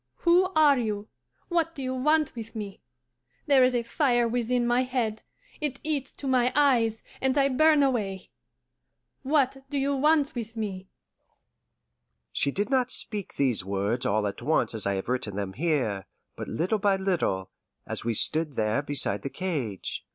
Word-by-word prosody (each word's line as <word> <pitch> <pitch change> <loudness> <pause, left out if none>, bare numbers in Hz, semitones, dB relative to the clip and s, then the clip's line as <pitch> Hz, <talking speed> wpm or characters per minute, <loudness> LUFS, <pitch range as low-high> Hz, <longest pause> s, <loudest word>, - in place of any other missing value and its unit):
Who 360 +2 +4
are 295 -4 +5
you? 215 -2 -3 0.4
What 335 -2 0
do 275 - -5
you 255 0 -2
want 300 +3 +1
with 230 0 -8
me? 205 -3 -6 0.6
There 275 -3 +5
is 255 0 +3
a 240 - +1
fire 240 -1 +1
within 240 +1 0
my 240 +1 +2
head, 245 -4 -2 0.4
it 290 -3 -3
eats 290 -3 -2
to 280 - -7
my 250 -1 +2
eyes, 240 -6 +3 0.2
and 265 +1 +1
I 275 -1 +4
burn 300 +2 +4
away. 205 -8 -1 0.9
What 275 -1 +1
do 285 - -2
you 280 +1 +1
want 300 +1 +2
with 230 -1 -6
me?'" 190 -4 -5 1.4
She 140 - +1
did 205 - -2
not 255 -2 +2
speak 210 -5 0
these 125 -8 +1
words 100 +5 -1
all 105 +1 +1
at 100 +2 -4
once 150 +1 +1
as 110 -3 -1
I 100 - 0
have 95 - -4
written 125 -5 -2
them 100 -2 -4
here, 130 - -1 0.3
but - - -6
little 185 +7 -1
by 200 -1 +3
little, 170 - -1 0.3
as - - -5
we 115 -1 -1
stood 155 +4 +1
there 110 +3 +1
beside 140 -9 +1
the 140 - -4
cage. 135 - -3
225 Hz, 170 wpm, -27 LUFS, -, 1.4 s, are